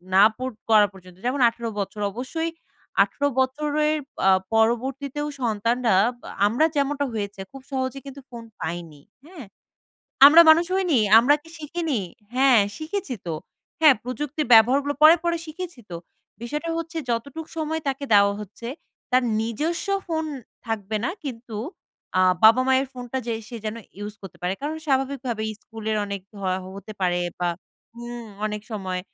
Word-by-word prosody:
না 195 - +8
পর 255 +1 -3
না - - -63
করা 210 -2 +6
পর্যন্ত 180 -2 -15
যেমন 260 +2 0
১৮ 230 0 -6
বছর 205 +1 -4
অবশ্যই 320 - -3 0.5
১৮ 285 - -1
বছরের 300 +3 +1 0.3
আ - - +7 0.2
পরবর্তীতেও 265 +6 0
সন্তানরা 230 -1 +1 0.5
আমরা 245 +9 +2
যেমনটা 285 0 0
হয়েছে 205 -2 -4
খুব 270 - -10
সহজে 260 0 -2
কিন্তু 275 0 -9
ফোন 235 -2 -9 0.2
পাইনি। 160 -3 -5 0.2
হ্যা? 345 +1 -13 0.9
আমরা 320 +4 +9
মানুষ 335 +2 +5
হইনি? 360 -9 +2 0.2
আমরা 260 +6 +5
কি 325 - -17
শিখিনি? 310 -4 -2 0.3
হ্যাঁ 260 -4 +5 0.2
শিখেছি 315 -3 -4
তো 165 - -2 0.5
হ্যাঁ 305 -4 +8
প্রযুক্তির 290 +4 -3
ব্যবহারগুলো 265 +6 +5
পরে 315 +2 +9
পরে 340 0 +1
শিখেছি 335 -3 -7
তো 170 - -4 0.5
বিষয়টা 300 +7 -3
হচ্ছে 330 0 -5
যতটুক 280 +7 -3
সময় 320 0 -2
তাকে 275 +1 -2
দেওয়া 200 0 +5
হচ্ছে 210 +3 -8 0.4
তার 255 0 +4 0.2
নিজস্ব 300 - -2 0.2
ফোন 320 -2 -1 0.4
থাকবে 215 -1 -2
না 340 - 0
কিন্তু 235 -4 -6 0.6
আ - - +5 0.2
বাবা 225 +4 +8
মায়ের 265 +1 +3
ফোনটা 250 0 -5
যে 235 - -1 0.2
সে 240 - -7
যেন 215 +1 -3 0.2
ইউজ 205 0 -6
করতে 195 - -11
পারে 180 +1 0
কারণ 305 +2 -2
স্বাভাবিকভাবে 265 -4 -1 0.2
স্কুলের 220 -1 -4
অনেক 200 -1 -4 0.2
হ - - -9 0.3
হতে 200 +2 -9
পারে 180 -1 +1 0.2
বা 175 - +1 0.6
উম 240 -1 -7 0.2
অনেক 210 0 -4
সময় 185 -3 -3
255 Hz, 150 wpm, -24 LUFS, 215-295 Hz, 0.9 s, আমরা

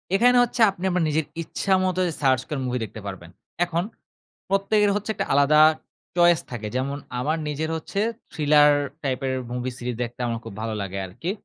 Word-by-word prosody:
এখানে 245 +4 +5
হচ্ছে 240 0 -2
আপনি 190 -1 -11
আপনার 180 -2 +1
নিজের 155 0 0 0.2
ইচ্ছা 195 +4 -1
মত 185 -1 0 0.2
সার্চ 130 -2 +3
করে 150 -3 -2
মুভি 125 0 -1
দেখতে 110 +1 -10
পারবেন। 85 -3 -8 0.4
এখন 170 0 -1 0.7
প্রত্যেকের 200 +1 +2
হচ্ছে 210 +1 -3
একটা - - -2
আলাদা 145 +2 +5 0.6
চয়েস 175 -1 +5
থাকে। 110 -3 -5
যেমন 135 +2 -1 0.2
আমার 155 +6 0
নিজের 155 +2 -2
হচ্ছে 195 +5 -5 0.3
থ্রিলার 150 -1 +5 0.3
টাইপের 130 0 -1 0.2
মুভি 125 +1 -3
সিরিজ 120 -1 -4
দেখতে 120 +1 -8
আমার 115 -1 -2
খুব 110 - -7
ভালো 110 -1 -2
লাগে 100 0 -5
আরকি। 125 - -4
145 Hz, 175 wpm, -24 LUFS, 125-175 Hz, 0.7 s, এখানে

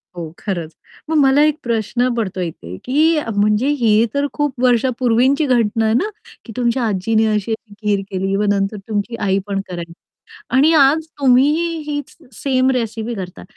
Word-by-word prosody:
हो, 165 -3 -6
खरंच. 170 -6 -4 0.3
मग 320 - +1
मला 280 0 +4
एक 305 0 +1
प्रश्न 235 +2 0
पडतोय 190 -6 -2
इथे, 90 - -9
की 310 +4 +2 0.2
म्हणजे 210 +5 +2
ही 225 -1 +4
तर 280 0 0
खूप 290 -3 -1
वर्षापूर्वीची 250 +3 +2
घटना 230 -4 +1
आहे 220 - +2
ना, 370 - +1 0.4
की 225 - -9
तुमच्या 245 0 0
आजीनी 215 +3 +1
अशी-अशी 215 0 -2
खीर 205 -2 +1
केली. 190 +1 -2 0.2
नंतर 200 +1 0
तुमची 215 +2 -2
आईपण 195 0 -1
करायची 170 -1 -6 0.6
आणि 295 +5 +5
आज 305 +2 +4
तुम्हीही 280 +5 +3 0.2
हीच 290 -2 -5 0.2
सेम 260 -1 +1
रेसिपी 230 -2 -2
करता. 185 -4 -7
230 Hz, 150 wpm, -18 LUFS, 205-265 Hz, 0.6 s, आणि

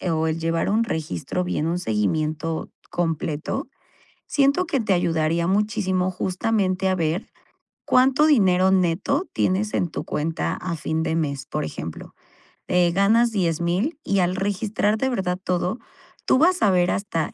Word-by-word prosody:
eh, 185 - -3
o 160 0 +1
el 160 +1 -1
llevar 165 +2 0
un 220 +3 +2
registro 160 - -3
bien, 160 -3 -1
un 170 +2 0
seguimiento 155 - -1 0.2
completo, 165 -3 -2 0.6
siento 280 +5 +2
que 310 -6 -1
te 200 -3 +1
ayudaría 165 -1 +1
muchísimo, 195 -2 +1
justamente 190 0 0
a 185 - +2
ver 165 +2 -1 0.6
cuánto 265 +3 +4
dinero 190 -9 +4
neto 190 - +1
tienes 200 +3 0
en 175 - +1
tu - - -5
cuenta 160 +3 -2
a 180 -2 -4
fin 160 +1 -2
de 160 - -1
mes. 140 -4 -2
Por 150 0 -3
ejemplo, 80 - -7 0.6
eh, 180 -1 +3
ganas 225 +5 +3
10000 180 - 0
y 200 - +1
al 180 0 +1
registrar 205 +2 0
de 265 +4 0
verdad 185 -7 -1
todo, 180 +3 -1 0.5
tú - - +4
vas 360 +4 +3
a 205 - +5
ver 180 -1 +3
hasta 190 -5 -2
180 Hz, 155 wpm, -23 LUFS, 165-210 Hz, 0.6 s, a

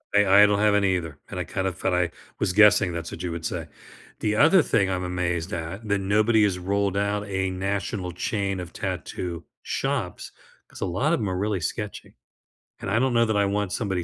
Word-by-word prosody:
I 105 - +6 0.2
I - - +9
don't 100 0 +2
have 105 -1 +4
any 100 -2 +3
either 80 -5 -5
and - - -5
I - - -1
kind 95 0 -2
of 90 -2 -4
thought 95 -1 -1
I 90 -1 +1 0.3
was 95 -3 0
guessing 105 -2 +6
that's 85 -1 -5
what 85 - -7
you 90 - -2
would 85 -1 -5
say. - - -3 0.5
The 105 0 0
other 165 - +6
thing 100 -9 +1
I'm 90 -1 -1
amazed 90 0 -2
at 85 +6 -5
that 100 -1 +1
nobody 105 +3 +3
has 95 -3 +1
rolled 100 +1 0
out 100 0 -1
a 95 -1 -1
national 95 0 -3
chain 100 +1 -2
of 90 -1 -7
tattoo 85 -2 -4 0.2
shops, - - -3 0.4
'cause - - -13
a - - +1
lot 125 - 0
of - - +1
'em 105 -4 -1
are 90 - -2
really 100 -1 -1
sketchy, 105 +6 -5 0.6
and - - -5
I - - +2
don't 130 0 +1
know 115 0 +4
that 110 -2 0
I 100 - +3
want 100 -1 -1
somebody 95 -6 -1
100 Hz, 220 wpm, -25 LUFS, 90-105 Hz, 0.6 s, I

